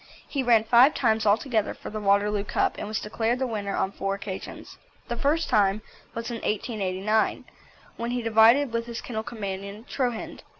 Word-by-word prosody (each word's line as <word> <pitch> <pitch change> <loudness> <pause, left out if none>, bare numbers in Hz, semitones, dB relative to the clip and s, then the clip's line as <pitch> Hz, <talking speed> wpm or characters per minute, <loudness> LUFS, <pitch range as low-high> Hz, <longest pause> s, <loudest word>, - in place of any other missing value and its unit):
He 280 - -2
ran 235 -4 +4
five 245 +6 +6
times 220 -4 +1
altogether 220 +1 +1
for - - -9
the 215 - -4
Waterloo 200 0 +2
Cup, - - 0
and - - -4
was 215 +1 -2
declared 225 +3 -1
the 260 - -1
winner 205 -4 -3
on 190 - 0
four 195 0 -2
occasions. 195 -1 -8 0.3
The 240 - -1
first 295 +6 +1
time 205 0 +2 0.3
was 230 +1 -4
in 235 - -3
1889, 210 -1 -1 0.5
when 235 0 -3
he 245 0 -2
divided 230 +4 +5
with 230 0 -2
his 235 -1 -5
kennel 220 -3 -4
companion 205 -2 -6
Troughend. 245 -4 -3
220 Hz, 175 wpm, -26 LUFS, 205-240 Hz, 0.5 s, five